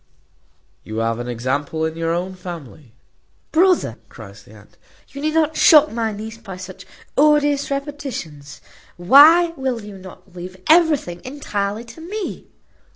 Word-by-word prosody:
You 110 - -7
have 115 +1 -1
an 120 - -5
example 140 +6 -2
in 160 0 -3
your 165 0 -2
own 180 +3 -2
family." 155 -9 -10 0.6
"Brother," 345 - +2
cries 100 -3 -12
the 105 - -18
aunt, 105 0 -19 0.3
"you 280 - -9
need 310 +1 -1
not 315 -1 +2
shock 305 -1 +6
my 225 -1 -2
niece 220 +2 -8
by 195 -5 -9
such 185 0 -10 0.3
odious 290 -1 +3
repetitions. 275 - -6 0.4
Why 305 - +6
will 260 -5 -3
you 205 -2 -10
not 185 0 -14
leave 180 +1 -9
everything 305 - +3
entirely 220 -6 -4
to 320 - -13
me?" 395 +4 -6
205 Hz, 145 wpm, -20 LUFS, -, 0.6 s, shock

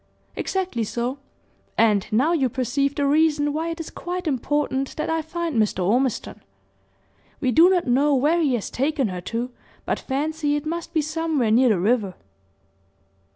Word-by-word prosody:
"Exactly 370 -12 -2
so; 245 +5 -3 0.6
and 210 -3 +3
now 265 +10 +3
you 270 -6 +2
perceive 275 +3 -1
the 285 - 0
reason 295 0 +2
why 320 +2 -2
it 330 0 -5
is 330 - -6
quite 360 +1 -5
important 275 -1 -1
that 310 - -2
I 325 0 0
find 325 -2 -3
Mr. 190 -4 0
Ormiston. 245 +5 0 1.0
We 255 - +1
do 330 +7 +6
not 365 -2 +2
know 275 +4 +3
where 305 +6 +2
he 280 -6 +2
has 225 - -4
taken 270 -3 0
her 180 -1 -5
to, 235 +7 -4 0.3
but - - -1
fancy 295 +2 -1
it 295 - -3
must 335 +1 -4
be 315 -3 +1
somewhere 310 -6 0
near 250 +3 +5
the 205 -5 +2
river." 205 -1 +1
285 Hz, 165 wpm, -23 LUFS, 245-320 Hz, 1.0 s, do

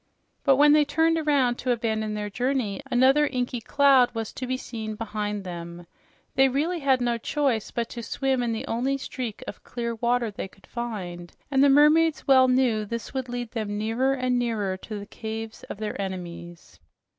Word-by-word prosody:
But 275 -2 +5
when 295 +2 +6
they 300 0 +6
turned 325 +2 +2
around 275 -6 +2
to 255 - -3
abandon 220 -2 -1
their 210 -1 -4
journey, 250 -2 -1
another 265 +4 +4
inky 245 -2 -2
cloud 270 0 +4
was 225 -1 -4
to 255 - -5
be 255 +1 -1
seen 220 -4 -6
behind 210 -2 -3
them. 170 -1 -7 0.5
They 270 0 +4
really 315 +7 0
had 265 -3 +2
no 240 -1 0
choice 260 -4 0
but 235 -1 -2
to 235 - -6
swim 265 +3 -1
in 240 -1 0
the 225 - -3
only 260 +4 -1
streak 255 -5 -6
of - - -8
clear 235 -1 -4
water 235 0 0
they 200 - -5
could 190 0 -22
find, 185 -8 -6 0.2
and 270 0 +4
the 285 - +6
mermaids 300 +3 +4
well 260 -1 +6
knew 250 -4 +2
this 230 +4 -6
would 260 -2 -3
lead 240 -1 -4
them 210 -3 -3
nearer 230 +5 +1
and 255 -2 0
nearer 215 -6 -1
to 210 +2 -7
the 200 - -7
caves 220 +1 -6
of - - -7
their 210 -1 -4
enemies. 175 - -7
240 Hz, 190 wpm, -26 LUFS, 215-265 Hz, 0.5 s, when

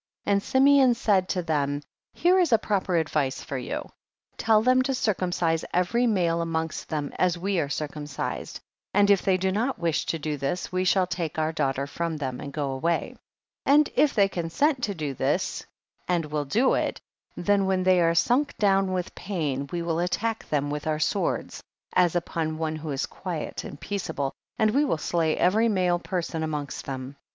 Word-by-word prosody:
37. 205 - +2
And 200 0 +1
Simeon 270 -1 +5
said 195 -5 +2
to 180 -2 -1
them, 145 -3 -1 0.3
here 365 +2 +4
is 345 -6 +2
a 225 - +7
proper 195 -4 -1
advice 155 -5 0
for 140 - -6
you; 125 - -4 0.5
tell 220 -1 +3
them 255 +1 +4
to 265 +1 0
circumcise 175 -7 0
every 235 +8 +2
male 170 -6 +1
amongst 160 -1 -3
them 150 -2 -3
as 180 -1 +2
we 190 +1 0
are 145 - 0
circumcis 145 0 -4
ed, - - -6 0.4
and 205 0 +5
if 200 - +4
they 190 -1 +2
do 190 +1 0
not 235 +7 0
wish 165 -2 -1
to 165 - 0
do 150 -1 -3
this, 140 +6 -3
we 185 0 0
shall 185 0 +3
take 170 -3 -4
our 155 0 +1
daughter 135 -4 -1
from 165 +2 -3
them 130 -4 -4
and 140 - -6
go 140 -1 -2
away. 165 +6 -1 0.5
38. 280 - +6
And 300 0 +5
if 300 - +3
they 200 -2 +5
consent 195 - 0
to 200 -3 -4
do 150 -4 -3
this - - -1 0.4
and 175 -3 +1
will 150 -1 -2
do 230 - +2
it, - - -1 0.4
then 200 +1 +2
when 190 -1 +1
they 185 -1 +4
are 165 0 +3
su7ik 250 - +2
down 195 -2 +2
with 180 -1 -3
pain, 145 -8 -3
we 170 -1 -2
will 165 -1 -1
attack 220 +6 -2
them 145 -1 0
with 150 +1 -4
our 155 -1 +1
swords, 195 +6 -1 0.3
as 175 -1 +3
upon 160 -2 -2
one 160 -1 -2
who 155 0 -6
is 135 -2 -1
quiet 175 -5 -5
and 145 - -9
peaceable, 160 -9 -3 0.2
and 215 -1 +3
we 280 +6 +3
will 275 - +1
slay 160 0 0
every 215 +6 +3
male 180 -4 +2
person 175 -3 -3
amongst 150 -2 -4
them. 130 -1 -5
39. - - -20
175 Hz, 195 wpm, -26 LUFS, 155-200 Hz, 0.5 s, a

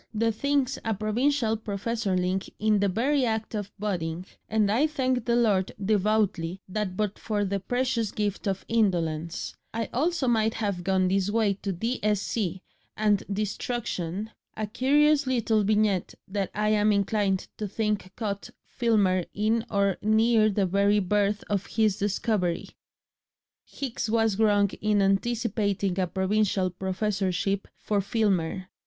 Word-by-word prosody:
"The 225 +1 +2
thing's 275 +3 0
a 225 -1 0
Provincial 225 +3 +1
professorling 200 -3 -2
in 215 -1 +2
the 200 0 +2
very 260 +8 +1
act 220 -2 -1
of 205 -2 -4
budding, 180 -4 -3 0.2
and 215 -2 +2
I 265 +8 +3
thank 260 -5 -1
the 235 - +2
Lord 205 -6 +2
devoutly 200 -3 +1
that 190 -1 -3
but 210 -2 -1
for 205 -2 -1
the 200 +1 -1
precious 245 +1 -1
gift 205 -1 -2
of 195 -1 -2
indolence 170 -7 0 0.2
I 230 -1 -2
also 305 +1 +1
might 225 -2 +2
have 200 -5 -2
gone 190 0 +2
this 195 +1 +1
way 215 -2 +2
to 195 - -2
D.Sc. 210 +2 -1 0.6
and 210 -2 +2
destruction..." 210 -2 -3 0.3
A 215 - -1
curious 285 +6 +3
little 225 -4 +2
vignette 210 -2 +1
that 195 -1 -2
I 210 +1 +1
am 210 0 +3
inclined 200 -1 +1
to 210 - -3
think 210 -2 -2
caught 205 -3 -4 0.2
Filmer 200 -7 +1
in 220 +2 +1
or 200 -2 +1
near 220 +1 +4
the 200 -1 +1
very 200 +3 +3
birth 205 +1 +1
of 200 -2 -1
his 215 -3 +1
discovery. 200 -3 0 0.9
Hicks 250 -5 -4
was 225 -2 +2
wrong 205 -2 +3
in 210 -1 +2
anticipating 200 -2 0
a 185 - +1
provincial 190 0 +1
professorship 190 +1 -1
for 205 -2 0
Filmer. 190 -4 0
210 Hz, 140 wpm, -27 LUFS, 195-225 Hz, 0.9 s, near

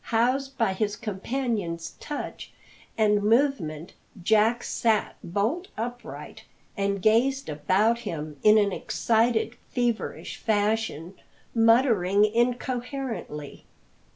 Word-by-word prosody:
Housed 255 +4 0
by 225 -5 +2
his 205 +1 -1
companion's 200 -6 -3
touch 295 - -6 0.5
and 210 -2 +3
movement, 205 - +1 0.3
Jack 220 +4 +3
sat 220 -3 0
bolt 225 - -1
upright, 240 +2 -6 0.3
and 200 -1 -1
gazed 260 +4 +2
about 195 +10 +2
him 155 -8 -6
in 215 +1 +6
an 205 -2 +3
excited, 230 +4 +1
feverish 240 -2 -2
fashion, 210 -5 -1 0.4
muttering 225 -4 +4
incoherently. 240 - -2
220 Hz, 95 wpm, -26 LUFS, 200-245 Hz, 0.5 s, in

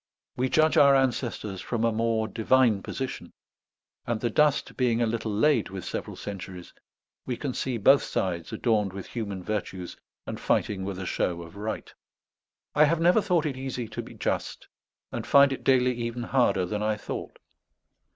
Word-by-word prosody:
We 130 +1 0
judge 155 +2 +3
our 140 -1 +7
ancestors 120 -7 -1
from 115 -2 -2
a 115 - +3
more 115 0 0
divine 115 0 +3
position; 130 +5 -5 0.7
and 120 -2 -1
the 120 0 -1
dust 150 +3 +2
being 120 -3 +1
a 120 - +3
little 110 -1 -2
laid 115 +3 +2
with 95 -2 -7
several - - -5
centuries, 95 -3 -8 0.5
we 125 -2 -2
can 140 -4 -3
see 125 -1 -2
both 135 +6 +6
sides 85 -3 -2
adorned 105 -5 +1
with 95 -1 -6
human 100 -6 -5
virtues 95 -3 -4 0.3
and - - -5
fighting 95 -2 0
with 100 -1 -4
a 95 - -5
show 85 -1 -1
of 85 +2 -13
right. 105 +2 -5 0.8
I 150 - +6
have 165 +2 +1
never 175 +6 +5
thought 180 -6 +1
it 140 -4 -2
easy 130 -3 -4
to - - -5
be - - -12
just, - - -3 0.4
and - - -5
find 140 -1 +6
it - - -7
daily 125 -1 +4
even 120 0 -4
harder 120 -7 +2
than 105 +3 -3
I 105 0 0
thought. - - -6
115 Hz, 175 wpm, -27 LUFS, 100-130 Hz, 0.8 s, our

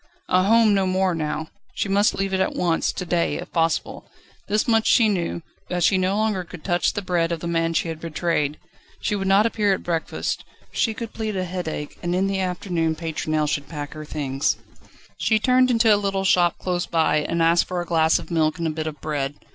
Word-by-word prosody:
A 185 0 +3
home 225 0 +5
no 195 -1 +2
more 185 0 +1
now; 155 0 -3 0.3
she - - -1
must 200 +2 +3
leave 195 0 -2
it 190 - +1
at 190 - 0
once, 170 -2 +1
to 180 - -5
day 170 -1 0
if - - -7
possible. 165 -1 -1 0.4
This 210 +2 +1
much 225 -1 +3
she 230 - +5
knew, 175 -4 -1 0.3
that 180 -1 -1
she 195 - +4
no 185 +2 +1
longer 215 -4 0
could 175 -2 -11
touch 175 -2 +1
the 205 - -3
bread 175 -2 0
of 170 - -2
the 170 - -7
man 165 -1 0
she 165 - +1
had 160 -1 -5
betrayed. 160 -2 -1 0.4
She 210 - -1
would 195 -1 -2
not 195 +3 +5
appear 210 -4 +2
at - - -9
breakfast, 165 -2 -2 0.3
she 225 -2 0
could 230 -1 -6
plead 220 -2 -3
a 185 -1 -1
headache, 170 -5 -5
and 175 0 -1
in 190 +1 +2
the 195 0 -1
afternoon 175 -3 -1
Pétronelle 155 -1 -1
should 145 -1 -2
pack 145 -3 -6
her 155 -1 -7
things. 140 -2 -1 0.6
She 220 - +3
turned 255 +3 +3
into 230 -2 +4
a - - +4
little 195 -1 -1
shop 175 -2 +3
close 180 -1 -2
by, 160 -2 +2
and 165 +3 -1
asked 170 +1 +4
for 180 -1 -3
a 175 - -3
glass 160 -1 +3
of 170 -1 -9
milk 160 0 +1
and 170 - -3
a 160 - 0
bit 155 0 -4
of 150 -2 -6
bread. 145 -2 -2
175 Hz, 225 wpm, -23 LUFS, 160-195 Hz, 0.6 s, home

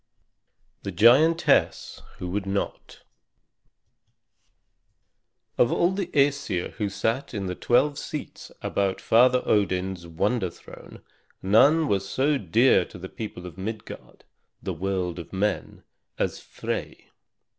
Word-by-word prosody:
THE 100 - -5
GIANTESS 135 - +3 0.2
WHO 90 - -5
WOULD 95 +2 -3
NOT 100 0 -4 2.6
Of 120 - +4
all 175 +2 +2
the 190 -2 -3
Æsir 140 - 0
who 105 -3 -3
sat 115 +6 -2
in 100 -2 -3
the 90 - -3
twelve 140 +9 +1
seats 150 - -7
about 100 -1 -1
Father 125 +2 +4
Odin's 95 -3 0
wonder 95 +4 -1
throne - - -14 0.4
none 140 +11 +5
was 95 -3 -1
so 140 +2 +1
dear 110 +3 +4
to - - -12
the 95 +1 -8
people 105 -5 -7
of 90 +1 -10
Midgard, 110 +2 -8 0.4
the 95 - -3
world 90 0 -2
of 85 - -10
men, 100 +1 -2 0.3
as - - -2
Frey. - - -6
105 Hz, 120 wpm, -25 LUFS, 95-130 Hz, 2.6 s, none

